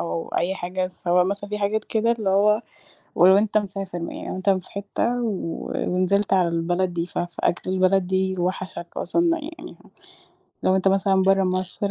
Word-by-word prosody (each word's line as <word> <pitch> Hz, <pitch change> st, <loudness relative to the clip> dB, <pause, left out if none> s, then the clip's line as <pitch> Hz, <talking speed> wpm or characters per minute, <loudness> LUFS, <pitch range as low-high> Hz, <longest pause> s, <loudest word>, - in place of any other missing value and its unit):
أو 85 Hz, -1 st, -3 dB
أي 185 Hz, +2 st, +1 dB
حاجة. 185 Hz, 0 st, -3 dB
سواء 180 Hz, 0 st, +1 dB
مثلًا 200 Hz, +2 st, -3 dB
في 210 Hz, -, -2 dB
حاجات 210 Hz, +1 st, 0 dB
كده، 230 Hz, +1 st, +1 dB
اللي 215 Hz, -4 st, -1 dB
هو 210 Hz, +3 st, +3 dB, 0.5 s
ولو 190 Hz, +2 st, +7 dB
أنت 215 Hz, 0 st, +2 dB
مسافر 195 Hz, -3 st, -3 dB
م 170 Hz, -, -5 dB
يعني -, -, -7 dB
لو -, -, -4 dB
أنت 185 Hz, +1 st, -1 dB
في 185 Hz, -2 st, 0 dB
حتة 205 Hz, +5 st, -2 dB
و 190 Hz, -7 st, -3 dB
ونزِلت 195 Hz, +3 st, +1 dB
على 185 Hz, -2 st, +4 dB
البلد 175 Hz, +2 st, 0 dB
دي، 170 Hz, -1 st, -1 dB
ف -, -, -9 dB
فأكل 175 Hz, +1 st, -2 dB
البلد 185 Hz, 0 st, +2 dB
دي 190 Hz, 0 st, 0 dB
وَحَشك 180 Hz, -1 st, -3 dB
أصلًا. 335 Hz, -, +1 dB
يعني 320 Hz, +3 st, -9 dB
ه -, -, -19 dB, 0.7 s
لو 185 Hz, -, +3 dB
أنت 190 Hz, 0 st, +2 dB
مثلًا 195 Hz, 0 st, +3 dB
برَّا 195 Hz, 0 st, +3 dB
مصر 185 Hz, +2 st, -2 dB
190 Hz, 185 wpm, -23 LUFS, 180-200 Hz, 0.7 s, ولو